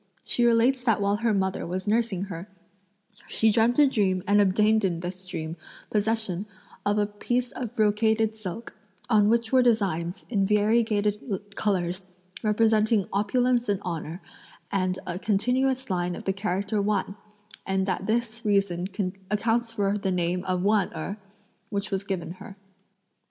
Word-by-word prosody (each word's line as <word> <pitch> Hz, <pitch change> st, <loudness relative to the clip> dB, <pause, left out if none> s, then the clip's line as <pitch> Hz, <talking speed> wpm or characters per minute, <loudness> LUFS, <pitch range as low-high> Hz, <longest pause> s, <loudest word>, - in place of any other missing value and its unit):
She 240 Hz, -, 0 dB
relates 240 Hz, +2 st, +3 dB
that 225 Hz, -4 st, +2 dB
while 200 Hz, 0 st, +1 dB
her 230 Hz, +1 st, +1 dB
mother 190 Hz, -2 st, 0 dB
was 185 Hz, +2 st, -3 dB
nursing 215 Hz, -4 st, +1 dB
her, 190 Hz, 0 st, -7 dB, 0.8 s
she 220 Hz, 0 st, +3 dB
dreamt 230 Hz, +3 st, +3 dB
a 295 Hz, -, +7 dB
dream 195 Hz, -8 st, +1 dB
and 205 Hz, +1 st, +5 dB
obtained 210 Hz, +3 st, +3 dB
in 170 Hz, -3 st, 0 dB
this 185 Hz, +1 st, -6 dB
dream 160 Hz, -1 st, -5 dB, 0.3 s
possession 210 Hz, -3 st, 0 dB, 0.4 s
of 205 Hz, +1 st, +1 dB
a 205 Hz, -, +3 dB
piece 240 Hz, +4 st, -2 dB
of 245 Hz, -2 st, -6 dB
brocaded 220 Hz, 0 st, +2 dB
silk, 215 Hz, +2 st, -7 dB, 0.4 s
on 210 Hz, -2 st, +5 dB
which 230 Hz, 0 st, +1 dB
were 260 Hz, -, +6 dB
designs, 195 Hz, -8 st, 0 dB
in 200 Hz, -5 st, +1 dB
variegated 210 Hz, -1 st, +1 dB
colours, 185 Hz, -3 st, 0 dB, 0.4 s
representing 215 Hz, -1 st, +3 dB
opulence 240 Hz, +4 st, +1 dB
and 200 Hz, -2 st, +1 dB
honour, 170 Hz, 0 st, -5 dB, 0.5 s
and 185 Hz, -2 st, 0 dB
a 180 Hz, 0 st, -4 dB
continuous 250 Hz, +6 st, +1 dB
line 175 Hz, -1 st, -1 dB
of -, -, -8 dB
the 195 Hz, -, 0 dB
character 200 Hz, +1 st, -1 dB
Wan; 200 Hz, -1 st, -1 dB, 0.5 s
and 190 Hz, 0 st, 0 dB
that 190 Hz, 0 st, -2 dB
this 230 Hz, 0 st, -1 dB
reason 195 Hz, -4 st, +1 dB, 0.4 s
accounts 225 Hz, +2 st, 0 dB
for 205 Hz, -1 st, 0 dB
the 195 Hz, -, -1 dB
name 180 Hz, 0 st, 0 dB
of 185 Hz, -1 st, -1 dB
Wan 205 Hz, -2 st, +2 dB
Erh, 200 Hz, -, -4 dB, 0.5 s
which 200 Hz, -1 st, -3 dB
was 195 Hz, 0 st, -1 dB
given 190 Hz, -4 st, -3 dB
her." 200 Hz, -, -10 dB
205 Hz, 150 wpm, -26 LUFS, 190-225 Hz, 0.8 s, a